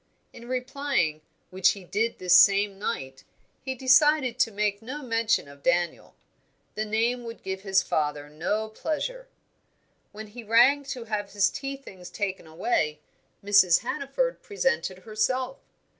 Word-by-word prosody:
In 235 - -12
replying, 255 - -1 0.3
which 185 0 +3
he 200 - -11
did 220 +6 -1
this 180 -1 +4
same 195 +1 +5
night, 135 -11 -4 0.4
he 265 0 -4
decided 260 0 +4
to - - +3
make 205 0 -1
no 270 +6 -7
mention 230 - +1
of 140 0 -15
Daniel. 175 +1 0 0.6
The 215 - -2
name 230 +3 0
would 230 0 -9
give 190 0 -4
his 195 -1 +2
father 150 -1 -1
no 180 +9 -2
pleasure. - - -4 0.8
When 215 +1 -8
he 235 +3 -10
rang 245 +6 +5
to 260 -3 -5
have 210 -3 -4
his 200 -1 +3
tea 275 0 -5
things 185 -9 -12
taken 190 -4 -4
away, 160 -2 -1 0.5
Mrs. 195 -4 +5
Hannaford 280 - -2
presented 415 - -1
herself. 255 +4 -1
215 Hz, 145 wpm, -26 LUFS, 190-255 Hz, 0.8 s, same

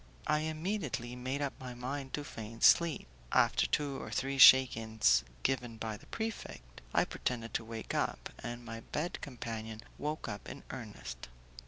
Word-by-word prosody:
I 150 0 +3
immediately 155 - -2
made 130 +3 -2
up 140 - -1
my 125 -1 -7
mind 130 +2 -4
to 150 - -4
feign 115 -4 -8
sleep. 170 - +5 0.2
After - - +4
two 145 -2 -1
or - - -6
three 135 0 -1
shakings 110 - +7 0.2
given 120 -4 0
by 110 -1 -3
the - - -14
prefect, 65 - -5
I - - +3
pretended 115 -2 -3
to - - 0
wake 115 0 -6
up, - - -1
and 120 0 -6
my 115 0 -6
bed 155 +9 -3
companion 115 -5 -5 0.2
woke 150 +1 -3
up 105 - -6
in - - -8
earnest. 100 - -7
125 Hz, 160 wpm, -33 LUFS, 110-145 Hz, 0.2 s, shakings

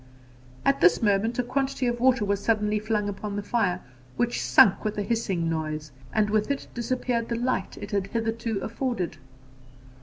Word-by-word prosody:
At 275 - +3
this 175 +5 +5
moment 215 +3 +2
a 250 - +2
quantity 265 +1 -1
of 240 0 0
water 255 -3 +3
was 200 0 0
suddenly 210 -1 +1
flung 210 -1 -1
upon 205 0 -4
the 205 - -3
fire, 200 -5 0 0.4
which 120 0 0
sunk 130 - +5
with 215 0 -2
a 205 - 0
hissing 195 -7 -1
noise, 155 -2 -3 0.2
and 215 -1 +2
with 215 +2 +1
it 280 -1 -2
disappeared 240 -1 -1
the 235 - 0
light 240 -5 -1
it 205 - -7
had 200 -1 0
hitherto 225 0 -2
afforded. 225 - -2
215 Hz, 175 wpm, -26 LUFS, 195-235 Hz, 0.4 s, this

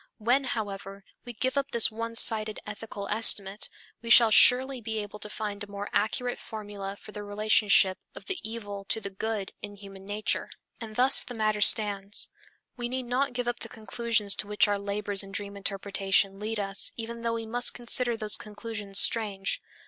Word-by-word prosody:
When, 245 +5 +1
however, 200 -4 -6 0.2
we 240 - -6
give 260 +4 -1
up 280 0 -5
this 235 -3 +3
one 230 +1 -6
sided 215 -2 +6
ethical 210 -1 -8
estimate, 205 -2 +2 0.3
we 230 - -7
shall 230 -1 +7
surely 255 +3 +5
be 220 0 -4
able 210 0 -6
to 210 - -4
find 210 -1 -5
a 205 - -11
more 200 0 -7
accurate 245 +4 -1
formula 205 -2 -8
for - - -13
the 210 - -8
relationship 205 -2 +2 0.2
of - - -11
the 385 -3 -3
evil 205 -3 -7
to 220 - -1
the 200 -2 -7
good 210 0 -4
in 205 -1 -8
human 195 -1 -13
nature. 210 +1 -2 0.3
And 220 -2 -9
thus 260 +3 +5
the 245 - -6
matter 215 -1 -1
stands. 205 -1 +4 0.5
We 240 -1 -5
need 255 0 -3
not 250 +2 -1
give 245 -1 -4
up 240 0 -2
the - - -6
conclusions 220 -1 +1
to 210 - -2
which 210 0 +2
our 205 -1 -1
labors 200 0 -1
in 195 -1 -7
dream 200 0 -5
interpretation 195 0 -1
lead 215 +1 -4
us 195 -1 0
even 230 0 -6
though 230 0 -1
we 225 0 -5
must 240 +2 +1
consider 240 0 +1
those 215 -2 +4
conclusions 210 -2 -6
strange. 200 -4 +2
215 Hz, 185 wpm, -27 LUFS, 200-230 Hz, 0.5 s, shall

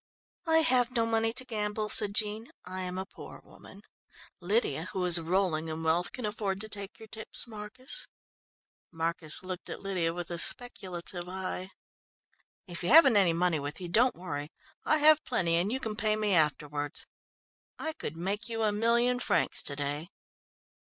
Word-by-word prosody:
"I 320 0 +5
have 250 -5 +4
no 230 -1 +3
money 225 0 +1
to 255 - -1
gamble," 210 -2 -2
said 205 -1 +4
Jean, 215 +2 -1 0.2
"I 185 +1 -5
am 180 0 -4
a 190 - -3
poor - - -12
woman. - - -15 0.6
Lydia, 180 - 0
who 185 -2 -1
is 175 -1 +7
rolling 165 -2 0
in 160 0 -4
wealth, 165 +2 +1
can 250 - -5
afford 205 -2 -2
to 215 - -4
take 200 -2 -7
your 220 - -12
tips, 220 0 -5
Marcus." 235 - -7 0.8
Marcus 165 0 -1
looked 185 -1 -6
at - - -7
Lydia 180 -4 0
with 175 0 -6
a 170 - -1
speculative 180 -6 0
eye. 185 0 -5 1.0
"If 175 -2 -6
you 175 - -1
haven't 280 -5 +8
any 190 -5 +5
money 170 -1 +1
with 145 +1 -5
you, 180 -2 -5
don't 240 +8 +3
worry. 150 -5 -5 0.4
I 310 - +3
have 310 0 +6
plenty 170 -2 0
and 185 +5 0
you 260 - -1
can 220 -4 -4
pay 215 -1 +1
me 210 -2 +1
afterwards. 150 -2 0 0.7
I 315 0 -4
could 160 - -7
make 200 +6 -3
you 225 -1 -2
a 215 - +3
million 235 +3 +2
francs - - +1
to 140 - -1
day." 145 +4 -3
195 Hz, 175 wpm, -30 LUFS, 170-225 Hz, 1.0 s, haven't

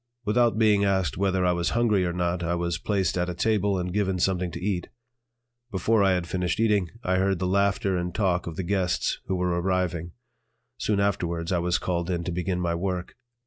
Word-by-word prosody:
Without 115 +1 +2
being 105 -2 +4
asked 95 -8 +1
whether 95 -1 +1
I 90 - +4
was 85 -1 0
hungry 105 -6 +3
or - - -1
not, 90 0 -1
I 85 0 0
was 85 0 -2
placed 95 -3 0
at 90 0 0
a 90 - -4
table 100 0 +1
and 90 0 -3
given 95 -2 0
something 90 0 0
to - - -7
eat. 90 -2 -2 0.8
Before 105 +1 +2
I 95 -1 +4
had 90 -2 -1
finished 90 +1 -2
eating, 105 -6 +2
I 95 0 +1
heard 95 0 +2
the 90 - -2
laughter 100 0 +1
and 90 0 -2
talk 90 -4 0
of 85 - -5
the 95 - -3
guests 90 0 0
who 95 - 0
were 90 0 0
arriving. 90 -2 -1 0.7
Soon 105 -2 0
afterwards 85 -4 -1
I 90 - +2
was 85 0 +1
called 85 -1 -2
in 85 -2 -1
to 90 - -3
begin 90 +1 -2
my 85 -1 0
work. 90 +1 -3
90 Hz, 210 wpm, -26 LUFS, 85-100 Hz, 0.8 s, being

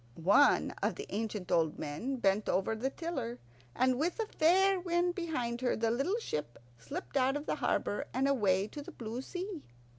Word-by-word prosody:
One 200 - +4
of - - +1
the - - -6
ancient 210 -3 -3
old 160 -2 +2
men 155 - -3
bent 205 -3 +1
over 190 +4 +1
the 245 +5 -1
tiller, 270 -7 -4 0.4
and, 255 0 +2
with 345 +8 0
a 450 - +1
fair 380 +1 +3
wind 350 0 +1
behind 255 -10 -2
her, 255 - +1
the 225 0 +1
little 275 - 0
ship 150 - -4 0.2
slipped 325 - -7
out 270 +1 +3
of 290 - -7
the - - -1
harbour 205 - 0
and 265 +2 +1
away 200 -8 +2
to 295 - -7
the - - -9
blue 230 +1 -5
sea. 360 +3 -5
255 Hz, 185 wpm, -32 LUFS, 215-335 Hz, 0.4 s, One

